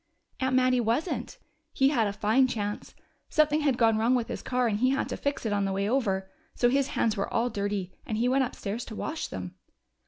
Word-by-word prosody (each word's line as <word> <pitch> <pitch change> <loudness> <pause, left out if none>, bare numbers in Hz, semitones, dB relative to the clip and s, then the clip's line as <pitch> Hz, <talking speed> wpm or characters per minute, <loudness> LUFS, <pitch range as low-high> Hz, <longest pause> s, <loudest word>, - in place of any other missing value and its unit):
"Aunt 260 -1 +1
Mattie 255 -1 +3
wasn't. 240 +9 -1 0.4
He 270 0 +4
had 235 -7 +2
a - - -1
fine 220 +6 +3
chance. 210 -4 -4 0.3
Something 305 0 +3
had 280 -4 +2
gone 225 -2 +3
wrong 235 +3 +3
with 240 -2 -1
his - - -4
car, 250 -1 0
and 210 -2 0
he 255 +2 +3
had 270 +1 0
to - - -2
fix 285 -3 -3
it 215 - 0
on 200 -1 +1
the 195 - -1
way 195 +1 -1
over. 200 -6 0 0.3
So 245 - +3
his 270 +1 +2
hands 225 -2 +2
were 200 - -2
all 240 +1 +1
dirty, 200 -3 -2
and 215 - -3
he 235 +2 +2
went 265 +1 +3
upstairs 225 -2 -4
to 220 - -8
wash 310 +8 -3
them." 90 -1 -6
235 Hz, 225 wpm, -28 LUFS, 205-260 Hz, 0.4 s, He